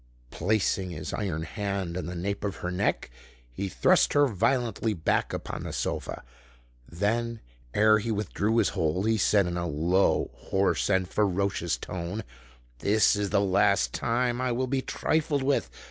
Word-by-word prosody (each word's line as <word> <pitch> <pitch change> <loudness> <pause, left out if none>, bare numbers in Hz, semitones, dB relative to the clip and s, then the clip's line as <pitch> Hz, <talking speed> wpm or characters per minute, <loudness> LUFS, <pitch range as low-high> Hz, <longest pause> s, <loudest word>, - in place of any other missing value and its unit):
Placing 95 0 0
his 85 - -6
iron 85 -7 -2
hand 100 -3 -3
on 90 -3 -3
the 90 - -5
nape 100 +4 -3
of 100 -2 -2
her 90 - -1
neck, 90 -8 -1 0.4
he 95 +11 -4
thrust - - +3
her 145 0 +5
violently 115 -1 0
back 80 - 0
upon - - -5
the - - -5
sofa: - - -3 0.7
then, 115 +6 -1 0.4
ere 110 0 +5
he 115 - -4
withdrew 105 +1 0
his 110 - +3
hold, 80 +6 0
he 110 -1 +2
said 100 -2 +4
in 90 0 -3
a 85 0 -2
low, 85 +5 +1
hoarse, 95 +1 0
and 95 -2 +2
ferocious 100 -1 0
tone, 90 +5 -5 0.6
"This 105 - +3
is 105 -1 -1
the 100 - +2
last 90 -10 +2
time 120 +1 0
I 130 -1 0
will 125 +2 0
be 135 +1 -1
trifled 150 0 0
with. 135 - +1
100 Hz, 160 wpm, -27 LUFS, 90-115 Hz, 0.7 s, her